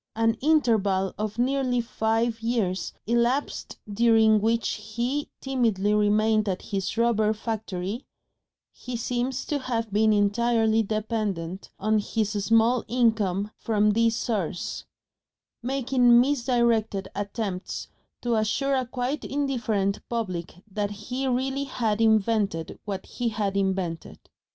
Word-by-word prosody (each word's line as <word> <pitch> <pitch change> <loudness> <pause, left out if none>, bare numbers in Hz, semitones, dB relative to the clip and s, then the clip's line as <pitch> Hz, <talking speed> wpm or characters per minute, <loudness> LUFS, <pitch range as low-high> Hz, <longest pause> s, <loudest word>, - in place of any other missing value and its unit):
An 225 0 +3
interval 220 -11 +2
of 215 0 -3
nearly 255 0 +1
five 225 0 0
years 225 -6 -1
elapsed 240 +5 0
during 220 0 +4
which 225 +1 +1
he 235 +7 -3
timidly 225 -7 +1
remained 210 0 +3
at 185 - -3
his 195 +1 -3
rubber 220 -2 +3
factory 215 -1 -4 0.6
he 250 -1 -7
seems 245 +2 -2
to 290 - -1
have 230 -5 -3
been 215 +1 +4
entirely 220 +2 +3
dependent 210 -5 -3
on 215 +1 +2
his 210 0 -1
small 230 +3 +3
income 215 -4 +1
from 210 -1 +2
this 230 +1 +2
source 200 -9 -3 0.8
making 250 -1 +4
misdirected 235 -6 +1
attempts 200 -2 -4 0.4
to 240 -1 +1
assure 220 +6 +1
a 260 -2 0
quite 255 +3 -3
indifferent 230 -8 -1
public 185 -6 -4
that 205 +1 -1
he 245 +6 -4
really 265 +2 0
HAD 225 -5 -1
invented 215 -6 +1
what 195 -2 -4
he 245 -2 -2
had 205 -3 -2
invented. 190 -4 -2
225 Hz, 115 wpm, -26 LUFS, 205-240 Hz, 0.8 s, during